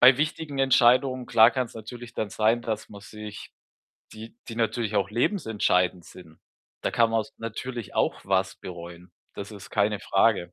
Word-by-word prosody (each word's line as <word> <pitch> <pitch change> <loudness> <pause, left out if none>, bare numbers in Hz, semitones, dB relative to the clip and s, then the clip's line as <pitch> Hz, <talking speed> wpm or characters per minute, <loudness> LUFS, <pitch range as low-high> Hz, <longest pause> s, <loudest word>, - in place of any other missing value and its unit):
bei 125 +1 +8
wichtigen 155 -1 -2
Entscheidungen, 130 0 +4
klar 115 +1 +6
kann's 130 -3 -2
natürlich 115 +2 -9
dann 110 - -2
sein, 110 +2 +2
dass 110 -2 -4
man 100 - -11
sich 105 0 -10 0.6
die 110 +1 -11
die 115 - -7
natürlich 110 -1 -1
auch 100 -1 +1
lebensentscheidend 105 - +1
sind. 80 -3 -14 0.4
Da - - 0
kann 115 -1 +3
man's 115 +4 -1
natürlich 115 0 -6
auch - - +1
was 95 0 0
bereuen. 85 0 -10 0.2
Das 100 +1 -7
ist 100 -1 -11
keine 105 -1 +1
Frage. 95 -3 +2
110 Hz, 160 wpm, -26 LUFS, 100-120 Hz, 0.6 s, bei